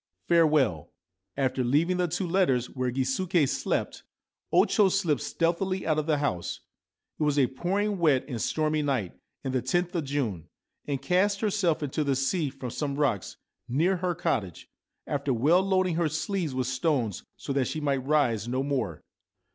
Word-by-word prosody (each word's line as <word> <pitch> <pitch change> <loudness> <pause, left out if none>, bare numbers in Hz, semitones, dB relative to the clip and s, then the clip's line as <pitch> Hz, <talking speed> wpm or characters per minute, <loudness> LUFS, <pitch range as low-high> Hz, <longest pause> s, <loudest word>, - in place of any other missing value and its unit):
Farewell! 150 - +3 0.3
' 95 0 -42
After 130 0 -2
leaving 155 +9 +2
the 180 -1 +1
two 180 +3 -2
letters 150 -9 +1
where 130 -1 -2
Gisuke 135 +6 +1
slept, - - -2 0.5
O - - +5
Cho 205 -2 +3
slipped 175 - +1
stealthily 185 +3 -1
out 155 -1 +2
of 155 - -3
the 155 -2 +2
house 115 -12 -2 0.6
(it - - -6
was 150 -1 +1
a 135 - +5
pouring 195 +10 -1
wet 150 -6 +3
and 120 -6 -4
stormy 155 +3 0
night 130 -11 -1 0.3
and 130 - -3
the 130 - +2
loth 175 +8 0
of 170 -3 -1
June), 125 - -2 0.4
and 140 -2 -2
cast 200 +2 +2
herself 195 -8 +1
into 145 +2 -1
the 140 -2 +1
sea 145 +4 0
from 130 -2 -7
some 140 +1 -3
rocks 135 -10 -1 0.3
near 170 +9 +2
her 180 0 -1
cottage, 120 - -2 0.4
after 140 -1 -1
well 155 +10 +4
loading 185 -2 +1
her 170 -2 +1
sleeves 160 -1 -2
with 130 -1 0
stones, 125 - 0 0.2
so 140 - -4
that 135 -2 +1
she 155 - -3
might 140 -3 0
rise 130 -6 +1
no 130 +2 -1
more. 125 - -2
145 Hz, 175 wpm, -27 LUFS, 130-175 Hz, 0.6 s, O